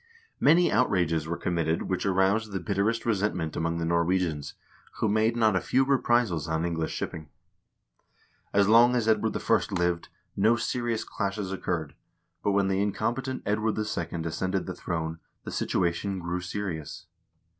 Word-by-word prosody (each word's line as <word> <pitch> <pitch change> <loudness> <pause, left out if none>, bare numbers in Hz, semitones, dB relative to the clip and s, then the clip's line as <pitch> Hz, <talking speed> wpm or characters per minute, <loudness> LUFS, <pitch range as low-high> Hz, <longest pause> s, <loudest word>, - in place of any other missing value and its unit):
Many 170 +5 +5
outrages 85 -9 +1
were 85 +1 -2
committed 85 -2 0
which 95 +1 -2
aroused 100 +3 +2
the 95 - -1
bitterest 105 +6 0
resentment 95 -7 0
among 85 0 -1
the 85 - -2
Nor 85 0 +2
wegians, 85 -4 -1 0.4
who - - 0
made 110 +2 +2
not 110 -3 +3
a 90 - +2
few 130 +7 +2
reprisals 120 - +2
on 80 +1 -1
English 80 -2 -2
shipping. 80 -2 -5 1.2
As 100 -1 +3
long 120 +3 +6
as 115 -3 0
Edward 110 -1 +2
I. - - +3 0.2
lived, 85 -1 0 0.3
no 110 +4 +4
serious 120 -1 -1
clashes 100 -1 -3
occurred, 85 -6 -3 0.5
but 100 - +1
when 100 -1 +2
the 95 0 +1
incompetent 120 +6 -2
Edward 105 +1 0
II. 85 -6 -3
ascended 95 +3 -2
the - - -4
throne, 80 -1 -4 0.2
the - - -6
situation 90 +3 -1
grew 90 0 -3
serious. 90 -4 -5
95 Hz, 155 wpm, -27 LUFS, 85-110 Hz, 1.2 s, long